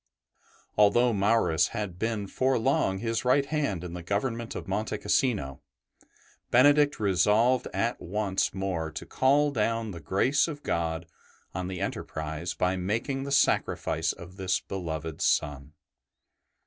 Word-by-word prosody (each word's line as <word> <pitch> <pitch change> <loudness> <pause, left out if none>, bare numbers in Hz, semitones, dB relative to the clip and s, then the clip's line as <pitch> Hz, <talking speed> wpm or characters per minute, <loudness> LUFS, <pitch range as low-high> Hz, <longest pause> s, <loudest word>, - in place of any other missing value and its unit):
Although 120 +4 +5
Maurus 100 -6 +2
had 95 -4 -4
been 110 -2 -1
for 130 +6 +1
long 95 -4 +1
his 115 +2 -2
right 130 +3 +3
ST. 140 - -14
BENEDICT - - -3
95 150 -2 +1
hand 90 -4 -5
in 85 -1 -6
the 90 - -6
government 115 +6 -2
of - - -6
Monte 105 +2 -2
Cassino, 100 - 0 0.9
Benedict 145 +3 +5
resolved 105 +6 +3 0.3
once 95 +1 -1
more 95 -4 -3
to 80 - -7
call 145 +2 +2
down 115 -2 -1
the 85 - -7
grace 100 - +2
of 145 -3 -7
God 80 0 -2 0.5
on 90 0 -3
the 95 -1 -5
enterprise 80 -2 -4
by 90 +1 +1
making 115 +9 -2
the 140 - -5
sacrifice 80 - +1
of 90 +2 -11
this 95 -1 0
beloved 80 -4 -5
son. 70 0 0
100 Hz, 145 wpm, -28 LUFS, 90-120 Hz, 0.9 s, Although